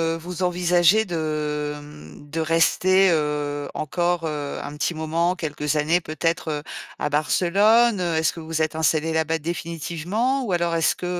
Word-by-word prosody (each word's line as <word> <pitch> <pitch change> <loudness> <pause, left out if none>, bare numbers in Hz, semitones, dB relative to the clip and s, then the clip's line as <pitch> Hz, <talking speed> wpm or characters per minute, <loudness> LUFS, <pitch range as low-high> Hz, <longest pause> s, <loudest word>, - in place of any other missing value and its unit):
heu, - - -5
vous 175 +1 -7
envisagez 180 +3 +3
de, 150 -3 -2
hem, 145 - -12
de 165 - -3
rester, 180 +4 +3
heu, 150 -2 -1
encore, 175 +3 -1
heu, 150 -2 -4
un 145 +1 -7
petit 170 +2 -1
moment, 165 +3 0
quelques 150 -3 -3
années 155 +4 +2
peut-être, 165 +2 -2
heu, 150 -1 -3 0.3
à 150 - -2
Barcelone? 200 +9 +3
Est-ce 165 -2 +1
que 170 - -9
vous 160 - -10
vous 160 -1 -1
êtes 155 0 -2
installés 160 0 +1
là-bas 160 0 +1
définitivement 170 - -2
ou 190 - -2
alors 170 -1 0
est-ce 165 -1 +2
que, 180 - -7
165 Hz, 165 wpm, -23 LUFS, 150-175 Hz, 0.3 s, envisagez